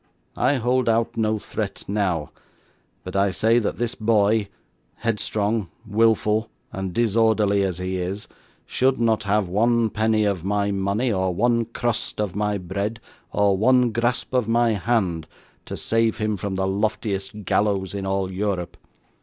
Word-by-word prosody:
I 130 Hz, +4 st, +2 dB
hold 125 Hz, 0 st, +1 dB
out 115 Hz, 0 st, +1 dB
no 110 Hz, -1 st, +1 dB
threat -, -, -5 dB
now, 95 Hz, -7 st, -1 dB, 0.7 s
but 90 Hz, -, -7 dB
I 100 Hz, +1 st, +3 dB
say 110 Hz, +6 st, +3 dB
that 110 Hz, -, -2 dB
this 120 Hz, 0 st, -1 dB
boy, 110 Hz, -1 st, +2 dB, 0.5 s
headstrong, 105 Hz, -2 st, -1 dB, 0.2 s
wilful 110 Hz, 0 st, +2 dB, 0.2 s
and 95 Hz, -1 st, -3 dB
disorderly 110 Hz, -2 st, +2 dB
as 95 Hz, -3 st, -1 dB
he 95 Hz, 0 st, -3 dB
is, 95 Hz, +3 st, -4 dB, 0.4 s
should 130 Hz, 0 st, +1 dB
not 115 Hz, -2 st, +2 dB
have 100 Hz, -1 st, +1 dB
one 115 Hz, +4 st, +2 dB
penny 110 Hz, 0 st, +2 dB
of 100 Hz, -5 st, -1 dB
my 100 Hz, +1 st, 0 dB
money, 100 Hz, +5 st, 0 dB
or 95 Hz, -2 st, 0 dB
one 115 Hz, +3 st, +2 dB
crust 120 Hz, -1 st, -2 dB
of 105 Hz, -4 st, -2 dB
my 105 Hz, 0 st, 0 dB
bread, 100 Hz, +5 st, -3 dB, 0.3 s
or 100 Hz, -1 st, +3 dB
one 125 Hz, +4 st, +3 dB
grasp 120 Hz, +3 st, -1 dB
of 125 Hz, -4 st, +1 dB
my 115 Hz, 0 st, +3 dB
hand, 95 Hz, -7 st, 0 dB, 0.4 s
to -, -, -5 dB
save 115 Hz, -1 st, +1 dB
him 110 Hz, -1 st, 0 dB
from 100 Hz, 0 st, -4 dB
the 95 Hz, 0 st, 0 dB
loftiest 100 Hz, 0 st, -2 dB
gallows 100 Hz, -1 st, +1 dB
in 100 Hz, -1 st, -4 dB
all 95 Hz, -1 st, -1 dB
Europe. 95 Hz, -2 st, -2 dB
105 Hz, 155 wpm, -23 LUFS, 95-115 Hz, 0.7 s, I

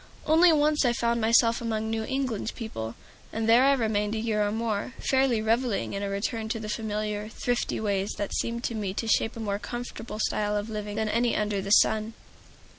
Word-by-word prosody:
Only 330 Hz, +3 st, +6 dB
once 300 Hz, -1 st, +3 dB
I 245 Hz, -2 st, +3 dB
found 235 Hz, 0 st, 0 dB
myself 230 Hz, +1 st, +4 dB
among 220 Hz, -1 st, -2 dB
New 225 Hz, 0 st, -1 dB
England 255 Hz, -3 st, -2 dB
people, 115 Hz, -, -5 dB, 0.4 s
and 225 Hz, 0 st, -2 dB
there 235 Hz, +3 st, +6 dB
I 280 Hz, -, +5 dB
remained 215 Hz, -4 st, 0 dB
a -, -, -1 dB
year 215 Hz, -2 st, 0 dB
or 205 Hz, -, 0 dB
more, 225 Hz, +1 st, -2 dB
fairly 260 Hz, -4 st, +2 dB
reveling 230 Hz, 0 st, 0 dB
in 200 Hz, -, -3 dB
a 200 Hz, -, -2 dB
return 220 Hz, +3 st, -2 dB
to 225 Hz, -, -2 dB
the 215 Hz, -1 st, -6 dB
familiar, 210 Hz, -1 st, -3 dB
thrifty 245 Hz, +1 st, -2 dB
ways 200 Hz, -2 st, -1 dB
that 205 Hz, -, -3 dB
seem 235 Hz, 0 st, -2 dB
to 235 Hz, -, -2 dB
me 200 Hz, -4 st, -3 dB
to 225 Hz, -, -2 dB
shape 225 Hz, +1 st, +1 dB
a -, -, -6 dB
more 205 Hz, -2 st, -2 dB
comfortable 240 Hz, -1 st, -6 dB
style 210 Hz, -1 st, 0 dB
of 205 Hz, +2 st, -4 dB
living 210 Hz, -1 st, -4 dB
than 220 Hz, 0 st, 0 dB
any 235 Hz, +2 st, +1 dB
under 210 Hz, -2 st, 0 dB
the 195 Hz, -, -5 dB
sun. 215 Hz, +2 st, +4 dB
220 Hz, 205 wpm, -27 LUFS, 210-235 Hz, 0.4 s, Only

